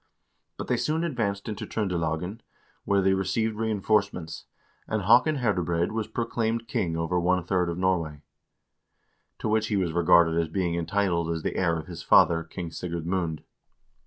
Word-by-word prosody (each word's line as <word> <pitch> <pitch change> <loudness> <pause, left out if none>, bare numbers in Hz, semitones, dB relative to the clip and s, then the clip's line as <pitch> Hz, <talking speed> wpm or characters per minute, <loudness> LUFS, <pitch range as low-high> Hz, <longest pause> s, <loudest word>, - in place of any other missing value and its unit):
But - - -5
they - - 0
soon 160 +2 0
advanced 110 -11 -2
into 105 -2 -5
Tr0ndelagen, 90 -1 -2 0.5
where 100 -1 +2
they 95 0 +4
received 110 +3 0
reinforcements, 105 -5 -1 0.4
and 110 -2 -1
Haakon 125 - +5
Herdebreid 90 - 0
was 110 -1 -2
pro 115 - -2
claimed 115 0 -2
king 85 -7 -1
over 80 +2 0
one 90 +1 +1
third 90 -1 0
of 85 - -3
Norway, 85 -6 -1 1.1
to - - -4
which 110 0 +1
he 105 - 0
was 90 -4 0
regarded 85 -1 +4
as 80 - -2
being 85 +1 -1
entitled 85 0 0
as 80 -1 -2
the - - -2
heir 85 -3 +1
of 80 - -6
his 85 -1 -8
father, 85 -1 +5
King 85 0 -7
Sigurd 85 0 -5
Mund. 85 -3 -2
90 Hz, 165 wpm, -26 LUFS, 85-105 Hz, 1.1 s, Haakon